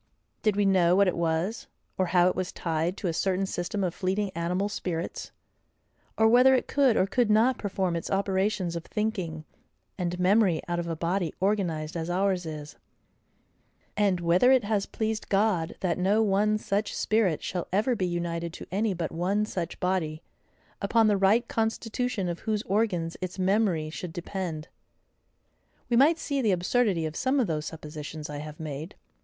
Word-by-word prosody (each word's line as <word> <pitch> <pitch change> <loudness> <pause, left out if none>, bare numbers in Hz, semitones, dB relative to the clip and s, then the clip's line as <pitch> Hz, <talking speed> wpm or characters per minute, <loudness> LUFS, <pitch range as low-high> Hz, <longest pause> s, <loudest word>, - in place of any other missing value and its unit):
Did 215 -2 +2
we 205 0 +2
know 180 -2 +4
what 200 0 +4
it 180 - +1
was; 170 +6 -1 0.3
or 185 - 0
how 175 0 +4
it 185 - +1
was 185 0 -2
tied 165 +3 -2
to 195 - -3
a 170 - 0
certain 190 +3 0
system 190 +2 -3
of 175 -3 -1
fleeting 190 +2 -1
animal 180 +4 -1
spirits; 180 -5 -4 0.9
or 220 - +5
whether 250 +3 +6
it 255 - -1
could 270 -5 +3
or 185 - +4
could 230 +3 +1
not 225 +4 +3
perform 190 -3 -1
its 170 - -4
operations 195 -2 0
of 170 - -4
thinking 185 -8 -3 0.5
and 180 0 -2
memory 185 -2 +3
out 175 0 -1
of 170 - -3
a 165 - -2
body 170 +2 -1
organized 175 -6 -1
as 165 0 -3
ours 185 -1 0
is; 150 -2 -7 1.2
and 200 -3 +2
whether 175 +9 +4
it 260 -3 +5
has 205 -1 0
pleased 220 -1 -3
God 195 -5 +1
that 180 -2 0
no 205 +4 +3
one 210 +1 +2
such 205 0 -2
spirit 215 -8 +1
shall 180 -2 -3
ever 215 +6 +2
be 185 -4 -1
united 170 -1 -3
to - - -8
any 200 +1 0
but 165 -2 -3
one 195 +5 0
such 180 -6 -4
body, 170 -4 -1 0.6
upon 220 +2 +3
the 205 - +3
right 205 +5 +3
constitution 225 -2 -1
of 170 -1 -3
whose 215 -1 -2
organs 185 -5 0
its 185 0 -4
memory 185 -5 +1
should 165 +1 -6
depend; 175 -3 -4 1.2
we 240 - +2
might 295 +7 +5
see 285 -4 -2
the 220 -5 +2
absurdity 185 -1 +1
of 155 0 -4
some 265 - +1
of 250 - +3
those 155 -4 -2
suppositions 150 -1 -7
I 145 - -5
have 150 0 -8
made. 155 +2 -6
185 Hz, 175 wpm, -27 LUFS, 170-210 Hz, 1.2 s, whether